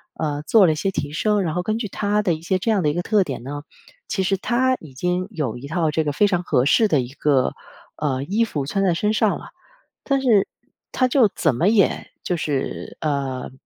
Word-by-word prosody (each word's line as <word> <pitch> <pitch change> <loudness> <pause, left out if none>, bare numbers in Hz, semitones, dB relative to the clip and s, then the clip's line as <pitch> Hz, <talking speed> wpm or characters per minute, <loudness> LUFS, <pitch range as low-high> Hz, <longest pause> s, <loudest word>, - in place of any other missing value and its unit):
呃， 145 -2 -2
做 220 -4 +6
了 165 - +4
一 - - -1
些 175 +6 -1
提 145 -6 -3
升， 210 +6 +1
然 160 -3 -2
后 180 - -1
根 215 +4 -1
据 225 -2 -3
他 205 +2 0
的 180 - +2
一 155 - -6
些 185 +3 0
这 205 +5 0
样 205 -3 +2
的 150 - +2
一 - - 0
个 175 +2 -2
特 210 0 +3
点 135 -8 -6
呢， 145 +3 -5 0.5
其 190 - -1
实 195 +1 +1
他 255 +5 +1
已 150 -5 -13
经 180 +5 -1
有 150 - -3
一 135 +3 -8
套 160 0 0
这 160 +1 0
个 150 - -1
非 145 +9 +3
常 180 -3 0
合 130 -7 +1
适 220 +9 +4
的 155 -7 +2
一 120 - -6
个， 140 -3 +1 0.4
呃， 135 -3 -1
衣 200 +10 +1
服 150 -11 -2
穿 195 +8 -1
在 180 -3 +2
身 210 +5 0
上 - - +2
了。 - - -12 0.5
但 275 -1 +1
是 225 -7 +3 0.4
他 255 - +2
就 250 -2 +4
怎 155 -5 +2
么 165 +9 +1
也 210 -2 +2
就 180 - -1
是， 140 -4 -3
呃， 135 -5 -2
175 Hz, 255 characters per minute, -22 LUFS, 145-210 Hz, 0.5 s, 做